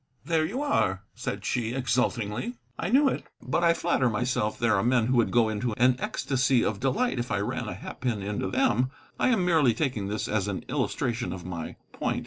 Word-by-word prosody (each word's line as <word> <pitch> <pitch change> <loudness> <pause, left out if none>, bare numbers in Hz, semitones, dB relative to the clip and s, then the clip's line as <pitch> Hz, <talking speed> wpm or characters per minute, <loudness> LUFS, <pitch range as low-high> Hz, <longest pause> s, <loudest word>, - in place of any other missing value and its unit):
"There 165 -2 +2
you 245 - -2
are," 95 - +1
said - - -5
she, 120 -1 -1
exultingly; 125 -2 -1 0.2
"I - - -1
knew 275 +5 +5
it. - - -1 0.2
But 175 - -1
I 170 0 +5
flatter 135 -8 +1
myself 110 -1 0
there 115 -2 +2
are 95 - +2
men 120 0 +3
who 130 +1 +2
would 115 - +3
go 120 -2 +3
into 110 +2 -1
an 125 +3 +4
ecstasy 130 -2 +1
of 100 -1 -1
delight 135 - 0
if 120 - -3
I 100 - +1
ran 120 +2 -2
a 90 - -4
hat 95 - -9
pin 115 -6 -1
into 100 -1 -2
them. 125 +6 +2 0.3
I - - +3
am 220 -8 +2
merely 155 -10 +4
taking 120 -8 -1
this 105 +2 -2
as 105 -2 0
an 100 -2 -4
illustration 125 -6 -1
of 90 -1 -7
my 85 -3 -5 0.2
point." - - -1
120 Hz, 210 wpm, -27 LUFS, 105-135 Hz, 0.3 s, knew